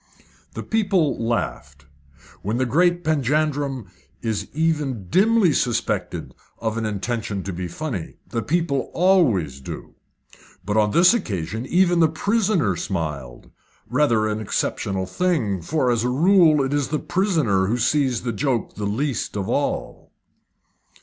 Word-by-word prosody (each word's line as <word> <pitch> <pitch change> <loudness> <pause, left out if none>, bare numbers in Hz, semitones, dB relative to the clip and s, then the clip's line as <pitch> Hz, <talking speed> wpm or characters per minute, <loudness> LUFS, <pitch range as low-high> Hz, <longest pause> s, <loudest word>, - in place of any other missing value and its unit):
The - - -4
people 190 - +1
laughed. 115 - -3 0.6
When 105 +4 -2
the 130 - +1
great 175 +7 +2
Panjandrum 145 - 0 0.4
is 110 -3 -2
even 150 - -1
dimly 205 - +4
suspected 100 -9 -1 0.2
of 110 -1 -2
an 115 -1 -1
intention 105 -1 -3
to 95 - -5
be 90 +1 -4
funny, 110 - -5
the 115 - -2
people 145 - -1
always 130 - +3
do. - - -8 0.7
But 105 +1 -1
on 105 -1 +3
this 175 - +5
occasion 110 - -3
even 175 -1 +3
the 160 -2 +5
prisoner 190 - +1
smiled 75 -9 -5 0.4
rather 115 -8 +2
an 105 0 -2
exceptional 100 -2 -2
thing, 110 - 0
for 130 - 0
as 115 -1 +1
a 125 - +1
rule 160 +1 +4
it 135 +1 -2
is 145 -2 0
the 155 - -1
prisoner 155 - +1
who 115 +4 0
sees 130 0 +1
the 120 -2 -2
joke 125 0 -1
the 105 -1 -3
least 125 +1 -2
of 95 -1 -2
all. - - -2
125 Hz, 140 wpm, -22 LUFS, 105-160 Hz, 0.7 s, this